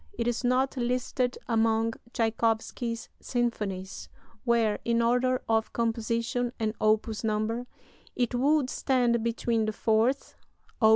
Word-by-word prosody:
It 235 - -2
is 240 +2 -1
not 255 +2 +1
listed 250 0 0
among 225 -1 +2 0.2
Tschaikowsky's 230 +1 -1
symphonies 205 -6 -3 0.4
where, 230 -3 +2
in 235 0 +1
order 250 +2 +2
of 225 -1 +1
composition 230 +1 -1
and 215 -1 0
opus 215 +1 +1
number, 220 +3 -1 0.5
it 245 -1 0
would 275 +2 +2
stand 240 -4 +1
between 230 -1 0
the 215 - -2
Fourth 225 +5 +1 0.5
(Op. 220 - +7
230 Hz, 120 wpm, -28 LUFS, 220-245 Hz, 0.5 s, Op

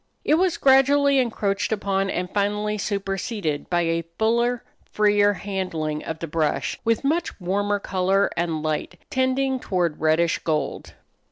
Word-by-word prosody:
It - - +3
was 355 +2 +2
gradually 280 +1 +4
encroached 210 -5 -1
upon 195 -2 0
and 180 -1 -2
finally 210 +1 0
superseded 195 -5 -3
by 175 -1 +2
a 165 0 0
fuller, 235 +2 +1 0.3
freer 205 -1 +3
handling 180 -7 -3
of 160 - -4
the 165 - -5
brush, 155 -1 -1
with 230 +1 +1
much 315 0 -1
warmer 205 +3 0
color 195 0 +1
and 165 -3 -1
light, 155 +3 -3
tending 260 0 +1
toward 175 -8 -1
reddish 160 +1 +2
gold. 155 -2 -3
200 Hz, 140 wpm, -23 LUFS, 170-230 Hz, 0.3 s, gradually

